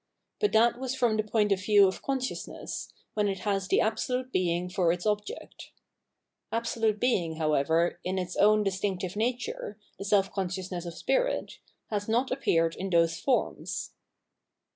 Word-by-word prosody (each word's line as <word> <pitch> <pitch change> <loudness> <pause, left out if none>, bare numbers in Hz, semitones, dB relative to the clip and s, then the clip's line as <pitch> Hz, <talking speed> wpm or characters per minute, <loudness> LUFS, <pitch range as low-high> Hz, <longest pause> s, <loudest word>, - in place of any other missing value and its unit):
But 420 - +2
that 235 +2 +4
was 260 0 -2
from 240 -4 +2
the 215 - +2
point 210 -1 +1
of 190 -1 +2
view 205 -1 +6
of 190 - -3
consciousness, 265 -2 -4 0.2
when 210 -1 +1
it 195 -2 -2
has 195 -2 -1
the - - +3
Absolute 250 +3 -1
Being 175 -2 0
for 180 -2 +2
its 175 0 -3
object. 210 0 -3 0.8
Absolute 225 -2 0
Being, 180 -10 +1
however, 160 +2 +1
in 185 +1 -2
its 180 -1 -3
own 210 +1 +5
distinctive 190 -1 -2
nature, 235 -2 -2 0.2
the 195 - -5
Self 195 -1 +2
consciousness 185 -2 -3
of 170 - -6
Spirit, - - 0 0.3
has 205 0 -2
not 240 +4 +1
appeared 165 -11 +1
in 195 +1 -4
those 165 -2 +3
forms. 260 -3 -1
200 Hz, 155 wpm, -28 LUFS, 180-230 Hz, 0.8 s, view